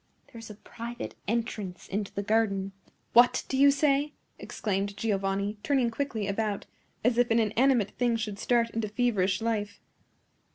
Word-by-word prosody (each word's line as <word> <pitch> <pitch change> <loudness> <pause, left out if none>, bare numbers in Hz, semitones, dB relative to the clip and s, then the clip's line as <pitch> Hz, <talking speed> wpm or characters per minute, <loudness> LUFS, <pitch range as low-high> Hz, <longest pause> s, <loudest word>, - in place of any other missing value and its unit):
There 230 - -9
is 225 - -10
a 210 - -9
private 235 +3 -7
entrance 210 -5 -3
into 200 0 -3
the 200 - -3
garden!" 200 -2 +1 0.4
"What 240 +1 +5
do - - -2
you 280 +1 +6
say?" 285 +1 +2 0.3
exclaimed 200 -1 -3
Giovanni, 200 -1 -1
turning 260 -3 +1
quickly 225 -5 -3
about, 205 0 -2 0.4
as 240 +1 +2
if 245 - +3
an 225 - +3
inanimate 230 0 +2
thing 240 -2 +2
should 210 -3 -4
start 235 -1 +1
into 225 -1 -2
feverish 205 -4 +1
life. 210 -3 -2
225 Hz, 155 wpm, -28 LUFS, 200-240 Hz, 0.4 s, you